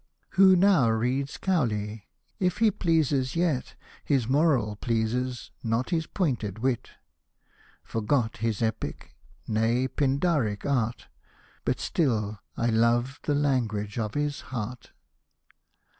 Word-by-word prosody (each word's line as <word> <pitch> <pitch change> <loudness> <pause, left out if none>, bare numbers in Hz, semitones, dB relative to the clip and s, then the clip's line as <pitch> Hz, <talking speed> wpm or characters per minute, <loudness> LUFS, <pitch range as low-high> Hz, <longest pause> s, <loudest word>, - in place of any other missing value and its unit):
" - - -46
Who 190 -1 +6
now 180 - +5
reads 125 +5 0
Cowley? 110 - -1 0.3
if 180 -2 +1
he 220 -2 +4
pleases 150 -8 +1
yet, 165 -7 0 0.3
His 135 -6 +1
moral 135 -7 +2
pleases, 120 +3 -1
not 115 +6 -1
his 160 -2 0
pointed 120 - -1
wit, 125 +1 -1 0.9
Forgot 115 +1 0
his 115 0 -1
epic, 110 -10 -3 0.3
nay 115 +4 +1
Pindaric 135 - 0
art, 125 -5 -1 0.6
But - - 0
still 110 -9 0 0.2
I 120 0 +1
love 120 +4 +2
the 145 - +1
language 115 -7 0
of 105 -2 -3
his 145 -1 -1
heart." 125 -1 -6
125 Hz, 115 wpm, -27 LUFS, 110-145 Hz, 0.9 s, Who